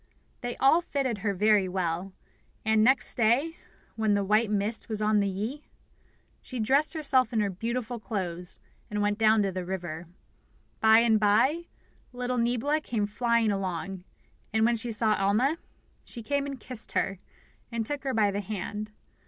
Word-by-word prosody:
They 245 0 -5
all 295 +6 +5
fitted 265 -9 -2
her 205 0 0
very 200 0 +3
well; 180 0 -2 0.5
and 220 0 +3
next 260 +3 +3
day, 250 +9 +1 0.4
when 220 -2 +1
the 200 - +1
white 215 +3 +2
mist 210 +3 -2
was 215 -2 -2
on 215 0 +2
the 200 - +1
Yi, 215 +10 -4 0.8
she 255 - -7
dressed 275 +9 +3
herself 270 -5 +2
in 225 - 0
her 205 -2 0
beautiful 235 +4 -3
clothes, 180 -5 -4 0.3
and 210 0 -1
went 205 +1 0
down 220 -1 +4
to 195 - -1
the 185 0 -4
river. 175 -3 -5 0.7
By 220 +1 +6
and 225 -2 +3
by 245 +12 +2 0.5
little 250 0 -2
Niebla 250 +6 +1
came 225 -7 -1
flying 230 +1 +1
along; 190 -1 -3 0.5
and 220 0 +2
when 235 +1 +3
she 230 +1 -4
saw 215 0 +4
Alma, 215 - +1 0.4
she 235 - -9
came 285 +3 -1
and 275 -2 -6
kissed 245 0 -4
her, 195 -1 -1 0.5
and 230 -1 -2
took 290 +3 -4
her 265 -3 -2
by 210 -2 +3
the 200 +1 -2
hand. 210 +1 -5
220 Hz, 170 wpm, -28 LUFS, 200-245 Hz, 0.8 s, By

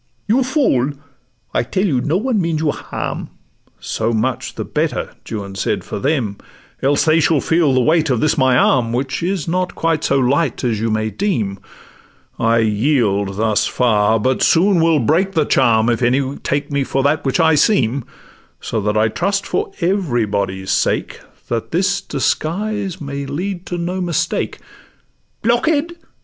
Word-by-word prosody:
'You 235 +5 +3
fool! 245 - +1 0.6
I - - +2
tell 185 - -1
you 135 -10 +1
no 155 +7 0
one 225 -1 0
means 165 -2 -1
you 155 -2 +1
harm.' - - -5 0.5
'So 115 +1 -2
much 110 -1 -2
the - - -4
better,' - - -2 0.2
Juan 100 -3 -5
said, 95 - -2
'for - - -5
them; 130 -8 -1 0.4
Else 140 +2 +2
they 160 +1 +4
shall 155 -1 +3
feel 160 0 +2
the 130 -1 +3
weight 160 +3 +2
of 125 -3 +1
this 155 - +2
my 130 -2 +3
arm, 120 -3 +2
Which 130 +1 -2
is 180 -2 -2
not 180 +2 -1
quite 165 -2 0
so 140 - +2
light 135 +2 +1
as 115 -4 0
you 115 - 0
may 110 0 -1
deem. 110 - -2 0.8
I 115 0 +3
yield 105 -3 +1
thus 110 -1 +1
far; 110 -2 +2
but 130 +4 0
soon 180 +1 +4
will 165 -1 +4
break 170 - +1
the 160 -4 +2
charm 110 -4 +3
If 120 0 +1
any 130 +3 +1
take 145 +1 -2
me 140 -1 +1
for 135 0 -1
that 150 +3 +1
which 135 +4 0
I 160 -1 +4
seem: 140 - +2 0.6
So 110 - -3
that 105 +1 0
I 110 +1 +3
trust 200 - -1
for 420 0 -2
everybody's 105 - -1
sake, - - 0 0.3
That 115 -1 -3
this 190 +4 +1
disguise 190 +7 -2
may 140 -2 -5
lead 175 +5 -4
to 175 - -3
no 180 +2 -3
mistake.' 175 -3 -1 0.9
'Blockhead! 290 +8 +1
140 Hz, 165 wpm, -18 LUFS, 115-175 Hz, 0.9 s, they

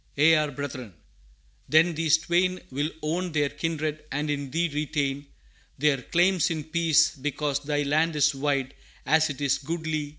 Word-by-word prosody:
ye 150 +3 +5
are 155 -1 +2
Brethren.' 130 - -7 0.7
Then 165 +3 +4
these 160 0 +3
twain 180 +3 0
Will 145 +3 -1
own 170 +3 -2
their 145 -2 +1
kindred, 155 0 -3
and 150 +2 -1
in 140 -2 -3
Thee 165 +5 0
retain 145 -2 -2 0.5
Their 140 -2 +2
claims 175 +3 +2
in 160 -3 -3
peace, 160 0 +2
because 145 +1 -2
Thy 145 0 -1
land 155 +3 +1
is 150 0 +3
wide 140 -1 -1 0.3
As 160 +2 +3
it 145 - -6
is 140 -1 +1
goodly! 155 0 -3
150 Hz, 160 wpm, -26 LUFS, 145-160 Hz, 0.7 s, ye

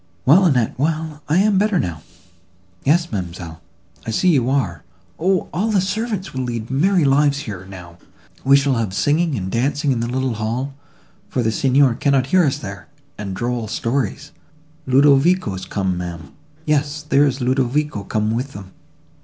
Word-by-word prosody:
"Well, 175 +8 +6
Annette, 125 -9 +2
well, 155 0 -2
I 155 - +3
am 200 0 +3
better 210 -1 +2
now." 85 - -2 0.8
"Yes, 170 +4 +2
ma'amselle, 85 -4 -6 0.4
I - - -7
see 180 +11 +2
you 130 -7 +2
are. 110 -11 -1 0.4
O! 185 +2 +1
all 200 +7 0
the 210 -3 +2
servants 200 +1 -2
will 130 - -3
lead 120 -2 -4
merry 175 +4 +2
lives 140 +1 +3
here, 95 -7 -7
now; 90 -2 -11 0.4
we 135 +1 +6
shall 140 -1 +1
have 110 -6 -2
singing 155 +1 +1
and 95 -4 -4
dancing 140 +4 0
in 125 - 0
the 115 - -1
little 130 0 -1
hall, 115 +5 -3 0.6
for 125 - -1
the 110 - +1
Signor 135 +2 +3
cannot 135 +1 +1
hear 180 +6 +3
us 135 -3 +1
there—and 105 -1 -9
droll 120 +2 -2
stories—Ludovico's 140 - 0
come, 95 -2 -2
ma'am; 85 -5 -7 0.3
yes, 150 0 0
there 145 -1 +3
is 135 0 -2
Ludovico 130 -1 0
come 105 +2 -1
with 125 +4 -3
them! 95 -2 -10
135 Hz, 160 wpm, -20 LUFS, 110-150 Hz, 0.8 s, Well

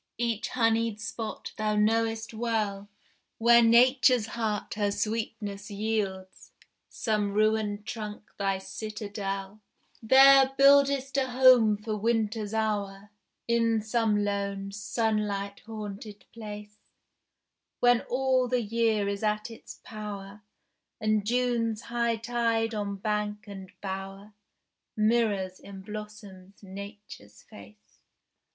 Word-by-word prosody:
Each 230 -2 -1
honeyed 230 -2 +1
spot 225 0 -6
thou 215 -1 0
knowest 225 +1 +1
well 215 -3 -2 0.5
Where 235 +1 +6
Nature's 245 0 +5
heart 220 -2 -3
her 205 -1 0
sweetness 210 -1 -3
yields, 200 -3 -4 0.4
Some 210 -3 -1
ruined 215 -1 +1
trunk 210 -2 -7
thy 195 -1 0
citadel; 200 0 -6 0.4
There 270 +3 +7
buildest 275 0 +4
a 265 -1 +1
home 245 -4 +6
for 215 +1 -4
Winter's 220 -1 -1
hour 205 -2 -2 0.4
In 230 -1 +2
some 220 -2 +1
lone, 200 -1 -3
sunlight 205 -1 -2
haunted 210 -1 -8
place, 210 -2 -9 1.0
When 245 -1 +4
all 260 0 +2
the 245 -1 0
year 220 -1 +1
is 200 0 -3
at 215 +1 -1
its 225 - -12
power, 205 -1 -8 0.6
And 215 -2 0
June's 235 -2 0
high 235 -1 0
tide 230 0 -1
on 205 -2 -3
bank 210 +1 -3
and 195 -2 -9
bower 195 +1 -6 0.6
Mirrors 215 -4 +1
in 195 -1 -11
blossoms 205 -2 -10
Nature's 200 - -11
face. 105 +1 -16
215 Hz, 105 wpm, -28 LUFS, 200-230 Hz, 1.0 s, There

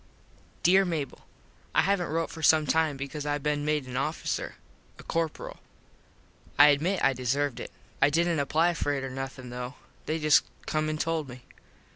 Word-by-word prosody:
Dere 190 +3 +6
Mable: 160 -7 -4 0.5
I - - +5
havnt 195 -3 +1
rote 165 +1 -1
for 160 - -8
some 155 0 +5
time 155 0 +1
because 140 +2 -5
I 145 0 0
been 145 0 -1
made 150 -2 0
an 125 -1 -8
officer. 150 +5 -2 0.4
a - - -12
corperal. 165 -2 -3 1.0
I 145 +1 +9
admit 165 +7 +1
I 135 - +4
deserved 130 +2 -1
it. - - -6 0.3
I 135 - +6
didnt 165 +1 +1
apply 160 +5 +2
for 145 -3 -1
it 135 -1 -2
or 135 - -4
nothin 135 -1 -6
though. 125 +2 -6 0.3
They 155 +2 0
just 150 -2 +4 0.2
come 155 0 -1
and 155 0 -3
told 160 -4 -1
me. 125 0 -11
150 Hz, 175 wpm, -28 LUFS, 135-160 Hz, 1.0 s, I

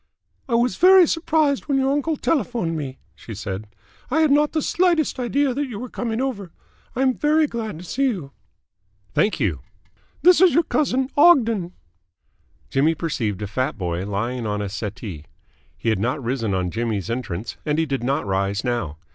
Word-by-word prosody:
"I 235 - +2
was 240 +1 +1
very 370 0 +7
surprised 310 -3 +1
when 280 -2 +1
your 270 0 +2
uncle 290 +2 0
telephoned 245 - -1
me," 135 -4 -5 0.2
she 110 - -10
said. 95 +1 -5 0.4
"I 320 +5 +2
had 310 -2 +3
not 295 +1 +3
the 315 - +1
slightest 345 -7 +1
idea 260 +2 +1
that 285 +2 -2
you 235 -5 -7
were 250 +3 -6
coming 230 -2 -3
over. 215 -9 -3 0.4
I 260 - +1
am 260 -1 +3
very 305 +4 +2
glad 225 - -5
to 170 - -10
see 275 +10 0
you." 185 - -2 0.8
"Thank 205 - +1
you." 95 - 0 0.6
"This 360 0 +6
is 370 -6 +6
your 335 - +5
cousin, 265 -4 0
Ogden." 230 - +4 1.0
Jimmy 155 +5 +2
perceived 110 - -2
a - - -3
fat 130 +5 -2
boy 90 -2 -2
lying 115 +4 -2
on 105 0 -2
a 100 -1 -3
settee. 95 -6 -6 0.5
He 115 - -1
had 110 -3 +1
not 125 +7 -1
risen 115 -5 -1
on 90 -1 -1
Jimmy's 115 -1 -2
entrance, 110 -4 -4
and 150 -1 -1
he 160 - +2
did 135 -4 -3
not 135 0 0
rise 100 +1 -1
now. 120 -12 -2
165 Hz, 180 wpm, -22 LUFS, -, 1.0 s, very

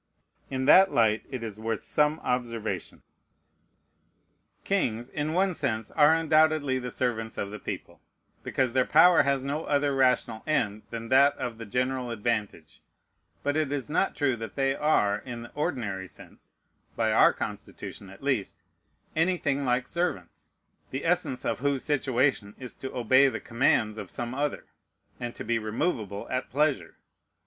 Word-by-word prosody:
In 130 0 -2
that 190 +6 +7
light 110 -2 +2
it 130 -3 -5
is 110 -2 -6
worth 110 0 -3
some 150 +1 +1
observation. 115 -3 -3 1.6
Kings, 120 - 0
in 150 +1 -3
one 190 +1 +2
sense, 115 -9 -3
are 150 +1 +5
undoubtedly 155 -4 +3
the 125 0 -5
servants 115 -2 -2
of 100 - -3
the 105 - -7
people, - - -7 0.4
because 130 -3 -1
their 130 -1 +4
power 165 +2 +7
has 140 -2 0
no 145 +3 -3
other 145 -1 +1
rational 125 -4 +2
end 110 -9 0
than 115 0 -6
that 140 +2 +5
of 115 -2 -5
the 115 - -7
general 125 +2 -1
advantage; 105 -7 -3 0.6
but 145 0 0
it 155 -3 0
is 145 0 -3
not 195 - +1
true 140 -4 +1
that 115 -2 -7
they 135 0 +1
are, 135 -9 +2
in 120 -2 -7
the 120 - -11
ordinary 115 - -3
sense, - - -15 0.4
(by - - +1
our - - +6
Constitution, 100 - -7
at 95 +7 -14
least,) 130 -8 -1 0.6
anything 155 -4 +1
like 125 0 +1
servants, 170 - -4 0.3
the 135 +4 -4
essence 170 -7 0
of - - -1
whose 140 0 0
situation 130 -6 0
is 125 -2 -8
to 130 - -7
obey 130 +3 +4
the - - -4
commands 115 -3 +1
of - - -7
some 120 0 -5
other, 145 +2 -2 0.5
and 120 -1 -5
to - - -7
be 115 +1 0
removable 110 - -2
at 130 0 -2
pleasure. 135 - 0
130 Hz, 155 wpm, -27 LUFS, 115-145 Hz, 1.6 s, that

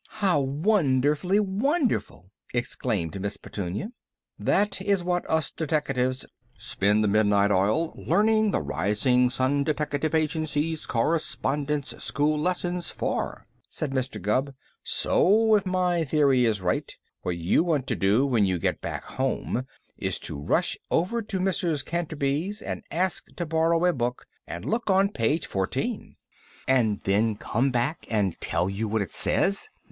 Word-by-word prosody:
"How 195 -8 +2
wonderfully 150 +3 +2
wonderful!" 210 - -1 0.2
exclaimed 105 -7 -2
Miss 100 +1 -3
Petunia. 100 - -5 0.5
"That 200 -2 +1
is 195 -2 +1
what 175 0 -1
us 160 -2 +1
deteckatives 135 -5 -1 0.3
spend 105 +2 +1
the - - +2
midnight 100 -1 +3
oil 105 - +2
learning 215 0 +2
the 185 - 0
Rising 105 - +2
Sun 135 +2 +1
Deteckative 150 +1 -1
Agency's 155 0 -1
Correspondence 145 +1 -1
School 150 +1 +1
lessons 175 +1 -1
for," - - -3 0.2
said 150 -3 -3
Mr. 130 -4 -2
Gubb. 130 +8 0 0.3
"So, 220 +3 +3
if 205 -3 +3
my 180 -2 +1
theory 140 -4 +3
is 110 -4 +1
right, 90 0 -1 0.3
what 85 - -2
you 85 - +2
want 155 -7 0
to - - -1
do 105 +8 +3
when 120 -6 +2
you 95 -1 0
get - - -1
back - - -4
home 130 -1 -2 0.3
is - - -2
to - - -5
rush 70 +1 0
over 190 +8 +1
to 205 -3 -4
Mrs. 175 -5 0
Canterby's 165 +3 -2
and - - -4
ask 185 +2 -1
to 175 - -3
borrow 165 +2 +2
a 180 - +4
book, 125 -2 -2 0.2
and 85 +4 -6
look 225 - -1
on 195 +1 +4
page 145 - 0
fourteen." 95 -1 -3 0.5
"And 115 -6 +2
then 105 +3 +2
come 120 +5 0
back 125 +5 -1
and 100 -6 +1
tell 90 - 0
you 100 +3 -2
what 105 0 0
it - - -10
says?" 200 - +1
145 Hz, 145 wpm, -26 LUFS, 110-175 Hz, 0.5 s, a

